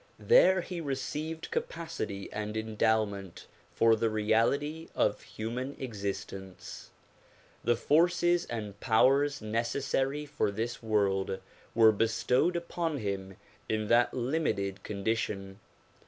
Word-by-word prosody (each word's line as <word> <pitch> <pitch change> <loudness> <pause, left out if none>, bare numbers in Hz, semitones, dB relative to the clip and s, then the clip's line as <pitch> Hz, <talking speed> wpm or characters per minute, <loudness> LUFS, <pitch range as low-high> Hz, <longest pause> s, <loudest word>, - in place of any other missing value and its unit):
There 190 - +5
he 175 -1 -5
received 155 +3 -4
capacity 155 -12 -4
and 105 0 -3
endowment 110 -3 -1 0.3
for 115 0 +4
the 115 +1 +1
reality 115 +9 +1
of - - +1
human 125 +5 -5
existence. 100 -5 -6 0.7
The 120 +1 +3
forces 175 +5 +3
and 105 -3 -5
powers 135 +5 +3
neces 115 +5 -1
sary 140 +2 0
for 135 -7 -1
this 115 +4 -3
world 100 -4 +1 0.4
were 110 -1 +7
bestowed 120 - +1
upon 170 -2 -2
him 100 -4 -4 0.3
in 110 -1 -1
that 120 +1 +4
limited 120 -8 -1
condi 105 +2 -1
tion. 95 -3 -4
115 Hz, 110 wpm, -30 LUFS, 105-145 Hz, 0.7 s, were